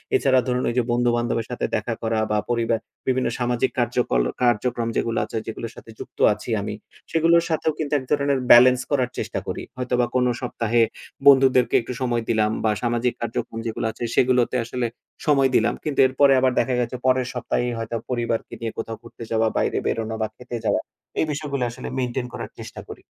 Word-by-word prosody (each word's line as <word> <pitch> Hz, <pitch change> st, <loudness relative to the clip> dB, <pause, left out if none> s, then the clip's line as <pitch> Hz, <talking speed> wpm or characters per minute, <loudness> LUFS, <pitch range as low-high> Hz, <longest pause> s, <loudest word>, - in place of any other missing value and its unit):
এছাড়া 130 Hz, -2 st, +4 dB
ধরুন 125 Hz, 0 st, 0 dB
ওইযে 120 Hz, 0 st, +1 dB
বন্ধু-বান্ধবের 120 Hz, -1 st, +1 dB
সাথে 125 Hz, -, -2 dB
দেখা 110 Hz, +2 st, -1 dB
করা 110 Hz, -1 st, 0 dB
বা 105 Hz, -, +2 dB
পরিবার 115 Hz, -1 st, +1 dB, 0.3 s
বিভিন্ন 130 Hz, 0 st, +1 dB
সামাজিক 120 Hz, +1 st, 0 dB
কার্যক্রল 120 Hz, -, +1 dB, 0.2 s
কার্যক্রম 120 Hz, 0 st, +1 dB
যেগুলা 115 Hz, -1 st, 0 dB
আছে 115 Hz, -, -5 dB
যেগুলোর 115 Hz, +1 st, -5 dB
সাথে -, -, -13 dB
যুক্ত -, -, -10 dB
আছি -, -, -9 dB
আমি, -, -, -4 dB, 0.4 s
সেগুলোর 165 Hz, +1 st, +4 dB
সাথেও 160 Hz, 0 st, +1 dB
কিন্তু 150 Hz, -1 st, -2 dB
এক -, -, -9 dB
ধরনের 140 Hz, -2 st, +2 dB
বেলেন্স 125 Hz, +1 st, +8 dB
করার 130 Hz, -3 st, +2 dB
চেষ্টা -, -, -3 dB
করি। -, -, -4 dB
হয়তোবা 125 Hz, -1 st, +1 dB
কোনো 125 Hz, -1 st, +3 dB
সপ্তাহে 120 Hz, -1 st, 0 dB, 0.5 s
বন্ধুদেরকে 130 Hz, -2 st, +6 dB
একটু 125 Hz, -, -6 dB
সময় 120 Hz, -2 st, 0 dB
দিলাম 110 Hz, -1 st, +2 dB
বা 110 Hz, -, +3 dB
সামাজিক 120 Hz, +1 st, +1 dB
কার্যক্রম 115 Hz, 0 st, -3 dB
যেগুলা 110 Hz, 0 st, -2 dB
আছে 120 Hz, -, -4 dB
সেগুলোতে 125 Hz, -1 st, +4 dB, 0.2 s
আসলে 120 Hz, 0 st, -2 dB, 0.4 s
সময় 135 Hz, -3 st, +4 dB
দিলাম। 115 Hz, -, +3 dB
কিন্তু 150 Hz, -3 st, -3 dB
এরপরে 135 Hz, +1 st, +4 dB
আবার 130 Hz, 0 st, +3 dB
দেখা 130 Hz, -1 st, +1 dB
গেছে 120 Hz, +1 st, -2 dB
পরের 130 Hz, -1 st, +3 dB
সপ্তাহেই 125 Hz, 0 st, -1 dB
হয়তো 115 Hz, +1 st, -4 dB
পরিবারকে 120 Hz, -2 st, -2 dB
নিয়ে 115 Hz, -1 st, -2 dB
কোথাও 115 Hz, -1 st, -4 dB
ঘুরতে 115 Hz, 0 st, -11 dB
যাওয়া, 110 Hz, 0 st, +2 dB
বাইরে -, -, +1 dB
বেরোনো 110 Hz, 0 st, -2 dB
বা 110 Hz, -, +1 dB
খেতে 125 Hz, -1 st, -8 dB
যাওয়া -, -, +2 dB, 0.4 s
এই -, -, +3 dB
বিষয়গুলো 140 Hz, -3 st, -2 dB
আসলে 120 Hz, -, -8 dB
মেইনটেইন 125 Hz, 0 st, -2 dB
করার -, -, -6 dB
চেষ্টা -, -, -8 dB
করি। -, -, -9 dB
120 Hz, 180 wpm, -23 LUFS, 115-130 Hz, 0.5 s, বেলেন্স